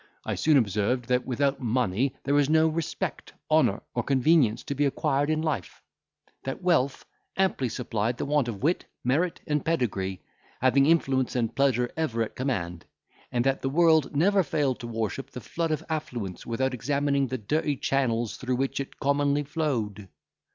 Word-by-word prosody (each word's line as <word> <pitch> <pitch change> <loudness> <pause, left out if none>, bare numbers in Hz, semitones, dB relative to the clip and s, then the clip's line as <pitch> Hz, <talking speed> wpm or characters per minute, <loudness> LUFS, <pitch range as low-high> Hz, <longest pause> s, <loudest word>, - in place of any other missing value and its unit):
I - - -1
soon 155 -2 +3
observed, 115 +2 0
that 125 0 +1
without 135 +2 0
money 125 +1 0
there 140 - 0
was 145 -1 +3
no 160 0 +5
respect, 160 0 -3 0.2
honour, - - +3
or - - 0
convenience 135 -3 +3
to - - -3
be 145 +1 +1
acquired 140 +1 0
in 155 0 +1
life; 145 - -3 0.6
that 135 +7 -5
wealth 140 -7 +1 0.3
amply 190 -10 +1
supplied 115 0 -2
the - - -2
want 145 -2 +1
of 110 -3 -5
wit, 170 +5 +1 0.2
merit, 160 +8 0
and 150 -2 0
pedigree, 100 - -1 0.4
having 135 +2 +4
influence 135 -6 +2
and 115 -3 -1
pleasure 130 -3 +2
ever 125 -8 0
at 110 - -7
command; 90 -11 -3 0.5
and 120 0 0
that 135 0 +1
the 135 - -1
world 160 -1 +3
never 195 +6 +4
failed 145 -5 0
to 120 - -6
worship 115 +3 -3
the 125 - -8
flood 165 +6 -3
of 155 0 -1
affluence, 120 - -4
without 130 +3 0
examining 140 +1 0
the 130 +1 -3
dirty 145 +6 0
channels 120 -5 0
through 130 -1 -1
which 135 +2 -1
it 140 - -6
commonly 145 +1 +1
flowed. 120 - -2
135 Hz, 170 wpm, -27 LUFS, 120-150 Hz, 0.6 s, no